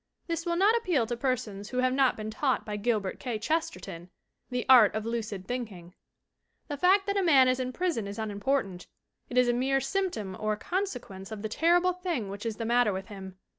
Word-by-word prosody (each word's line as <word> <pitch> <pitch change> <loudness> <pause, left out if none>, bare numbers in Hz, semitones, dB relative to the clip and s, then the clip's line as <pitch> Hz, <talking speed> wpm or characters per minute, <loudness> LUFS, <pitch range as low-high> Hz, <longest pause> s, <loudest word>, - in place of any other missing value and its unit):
This 335 -1 -3
will 340 - +1
not 400 +6 +4
appeal 360 - +1
to 240 +2 -3
persons 220 -5 -3
who 250 - -5
have 255 0 +2
not 265 -1 +3
been 215 0 -5
taught 260 +2 0
by 210 - -4
Gilbert 210 -2 -1
K. 245 -5 -3
Chesterton 185 - -3 0.4
the 250 -1 -2
art 245 -6 +7
of 215 0 -2
lucid 220 -5 -4
think 245 -3 -3
ing. 175 -1 -13 0.8
The 290 - -2
fact 375 +6 +4
that 400 0 -1
a - - +3
man 280 -8 +6
is 255 0 +2
in 255 0 -2
prison 325 - -1
is 200 +1 -7
unimportant; 205 -2 -2 0.4
it 245 - -4
is 250 -1 +5
a 240 - +3
mere 265 +3 +1
symptom 270 - -2
or 215 0 0
consequence 245 - -4
of 215 -1 -6
the 215 - -2
terrible 350 +8 +3
thing 345 - -3
which 200 +3 -5
is 225 - -3
the 230 - -4
matter 240 -1 +3
with 190 +3 -5
him. 190 -2 -9
245 Hz, 210 wpm, -28 LUFS, 210-295 Hz, 0.8 s, art